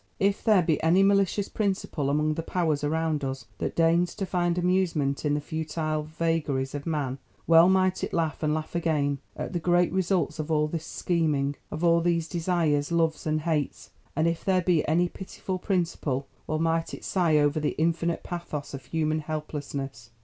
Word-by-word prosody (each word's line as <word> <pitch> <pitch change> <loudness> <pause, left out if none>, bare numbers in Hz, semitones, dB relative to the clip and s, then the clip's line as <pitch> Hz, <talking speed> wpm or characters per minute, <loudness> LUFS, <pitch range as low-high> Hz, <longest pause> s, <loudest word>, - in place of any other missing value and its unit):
If 200 +1 +1
there 210 -5 +5
be 160 -2 +1
any 175 +4 +4
malicious 200 0 +2
Principle 190 -8 -1
among 150 +2 +1
the 165 - -3
Powers 160 -4 -1
around 155 0 0
us 135 0 -4
that - - -2
deigns 170 +1 +3
to 195 - -2
find 175 -1 0
amusement 175 -6 +1
in 145 0 +2
the - - 0
futile 155 0 -2
vagaries 155 -4 -1
of 145 +1 -5
man, 140 -5 -2 0.3
well 165 +2 +7
might 185 0 +2
it - - -2
laugh, 160 -3 -1
and 155 -1 +1
laugh 155 0 -3
again, 150 -5 0 0.2
at - - -5
the 175 - 0
great 175 +1 +2
results 185 -2 0
of 155 - -3
all 150 -1 +2
this 160 +1 -5
scheming, 150 -5 0
of 155 +2 -5
all 170 0 +4
these 170 -1 +1
desires, 165 -4 0
loves 165 -2 +1
and 155 0 +1
hates; 155 -3 -2 0.2
and 155 +3 +2
if 165 -1 -1
there 185 -2 +2
be 175 -3 +3
any 175 +3 +3
pitiful 185 0 -6
Principle, 165 -8 -1 0.2
well 155 - 0
might 165 0 0
it - - -13
sigh 170 -5 +2
over 145 +1 +2
the 150 - -1
infinite 170 +1 0
pathos 170 -5 -5
of 135 -3 -7
human 155 +2 0
helplessness. 145 -5 -5
160 Hz, 185 wpm, -27 LUFS, 150-175 Hz, 0.3 s, well